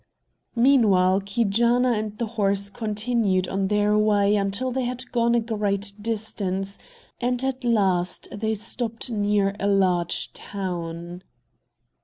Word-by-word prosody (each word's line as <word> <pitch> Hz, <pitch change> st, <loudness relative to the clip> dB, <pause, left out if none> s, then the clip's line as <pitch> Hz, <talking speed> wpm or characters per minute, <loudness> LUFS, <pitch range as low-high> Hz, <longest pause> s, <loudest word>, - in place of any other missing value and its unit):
Meanwhile 205 Hz, -7 st, +4 dB
Keejaanaa 235 Hz, +4 st, +2 dB
and 215 Hz, -1 st, -3 dB
the 235 Hz, -, -1 dB
horse 200 Hz, -3 st, -1 dB
continued 215 Hz, -3 st, 0 dB
on 195 Hz, 0 st, -1 dB
their 210 Hz, +1 st, +2 dB
way 210 Hz, -1 st, +3 dB
until 200 Hz, +6 st, -1 dB
they 260 Hz, 0 st, -1 dB
had 250 Hz, +1 st, -5 dB
gone 235 Hz, -1 st, +2 dB
a -, -, +4 dB
great 205 Hz, -3 st, -2 dB
distance, 200 Hz, -3 st, -3 dB, 0.4 s
and 245 Hz, +1 st, 0 dB
at 265 Hz, -1 st, -2 dB
last 190 Hz, -7 st, +1 dB
they 220 Hz, +1 st, -2 dB
stopped 230 Hz, +2 st, -4 dB
near 205 Hz, -2 st, +1 dB
a 200 Hz, -, 0 dB
large 185 Hz, -4 st, +1 dB
town. 175 Hz, -2 st, -5 dB
210 Hz, 125 wpm, -24 LUFS, 195-235 Hz, 0.4 s, Meanwhile